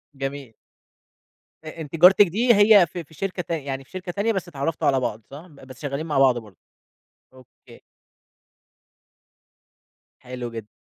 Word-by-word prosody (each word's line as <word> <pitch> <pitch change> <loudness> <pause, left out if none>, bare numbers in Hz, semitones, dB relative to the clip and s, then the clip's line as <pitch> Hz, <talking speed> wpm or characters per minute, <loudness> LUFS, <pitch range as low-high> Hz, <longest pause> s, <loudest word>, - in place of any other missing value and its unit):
جميل. 135 -3 -6 1.1
أ 155 +1 -9
أنتِ 150 0 -7
جارتِك 185 +4 +6
دي 235 +8 +2
هي 205 -3 +6
في 170 +2 -7
في 160 - -21
شركة 185 +3 -4
تان 165 -2 -4
يعني 135 -1 -5
في - - -28
شركة 185 -1 -6
تانية 205 +5 -1
بس 190 -3 -4
اتعرَّفتوا 155 -1 -3
على 135 -1 +3
بعض، 115 -3 -4
صح؟ 150 +6 -11
بس 135 -5 -15
شغالين 145 +1 -4
مع 150 -4 -1
بعض 130 -3 +4
برضه. 105 -6 -11 0.8
أوكي. 130 -2 -19 2.4
حلو 125 -1 -7
جدًا. 115 -2 -8
145 Hz, 150 wpm, -23 LUFS, 130-180 Hz, 2.4 s, جارتِك